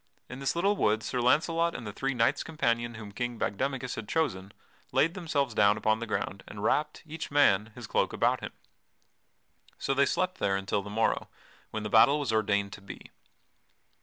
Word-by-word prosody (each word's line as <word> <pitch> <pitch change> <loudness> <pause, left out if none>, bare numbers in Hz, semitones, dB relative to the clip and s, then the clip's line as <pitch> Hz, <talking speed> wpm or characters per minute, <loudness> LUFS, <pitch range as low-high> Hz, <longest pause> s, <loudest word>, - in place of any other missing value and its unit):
In 125 - -7
this 135 +3 -1
little 195 +4 +2
wood 110 - +1
Sir 125 - -2
Launcelot 165 +6 +2
and 115 - -6
the 105 - -6
three 135 +4 -2
knights 120 +4 +2
companion 120 -7 -1
whom 105 -2 -8
King 120 +3 -3
Bagdemagus 130 +4 -2
had 110 -2 -7
chosen 100 - -1 0.4
laid 165 +2 +3
themselves 150 - -1
down 105 0 +4
upon 110 +1 +1
the 115 - -5
ground 100 -2 -3
and 105 -1 -8
wrapped, 150 +7 0
each 160 0 -6
man, 110 -7 +3
his - - -8
cloak - - 0
about - - +1
him. - - -6 1.3
So 135 - -1
they 140 +1 +3
slept 185 0 -1
there 95 - +1
until 95 +1 -1
the 105 - -9
morrow, 110 +2 0 0.4
when 110 -1 -4
the - - -2
battle 135 +7 +6
was 135 -6 -1
ordained 100 -2 +1
to - - -10
be. 100 - -11
120 Hz, 190 wpm, -29 LUFS, 105-145 Hz, 1.3 s, battle